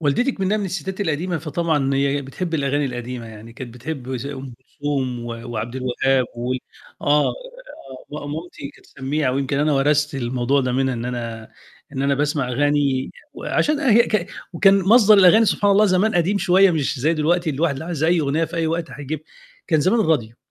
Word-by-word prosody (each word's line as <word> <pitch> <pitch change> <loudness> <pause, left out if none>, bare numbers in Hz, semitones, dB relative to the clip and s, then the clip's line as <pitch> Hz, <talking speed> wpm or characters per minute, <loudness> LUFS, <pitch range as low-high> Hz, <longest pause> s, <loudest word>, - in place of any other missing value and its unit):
والدتي 160 - +1
إكمنّها 195 -1 -1
من 205 - -2
الستات 190 +1 -4
القديمة 170 -1 -1
فطبعًا 150 -3 -1
هي 140 +1 +1
بتحب 165 +5 -5
الأغاني 145 0 0
القديمة 120 -2 -5
يعني، 110 +1 -11
كانت 120 -1 -9
بتحب 130 0 -6
زَي 140 +4 -5
أم 130 -2 -8
كلثوم 130 -3 -4
و - - -7 0.2
وعبدالوهاب 125 +3 0
وال 125 +2 -2 0.4
آه، 145 +1 +3 0.8
م 145 -1 -6
مامتي 160 -3 -7
كانت - - -20
سمّيعة، 135 0 -2
ويمكن 140 +1 -1
أنا 150 +1 +2
ورثت 145 +1 +2
الموضوع 130 +2 0
ده 130 -1 -1
منها 130 0 0
إن 115 0 -5
أنا 115 -3 -5 0.4
إن 135 - -3
أنا 140 0 +2
باسمع 145 -2 -1
أغاني 140 0 +1 0.2
وعشان 300 0 0
هي 235 -5 +5
ك 215 -6 -1 0.3
وكان 195 +3 +4
مصدر 215 +2 +6
الأغاني 195 +4 +7
سبحان 205 -1 +2
الله 205 +2 +5
زمان 195 +3 +2
قديم 180 +4 +2
شوية 190 +1 +4
مش 150 -5 -1
زَي 155 +5 +2
دلوقتي 165 +2 +1
الواحد 150 +2 0
اللي 140 +4 -6
عايز 165 -3 -2
أي 170 0 +3
أغنية 150 +3 0
في 165 +1 -7
أي 165 -1 0
وقت 165 0 -2
هيجيبها. 145 +2 -6 0.4
كان 155 -2 +2
زمان 205 +8 +2
الراديو، 120 - 0
145 Hz, 180 wpm, -21 LUFS, 130-170 Hz, 0.8 s, الأغاني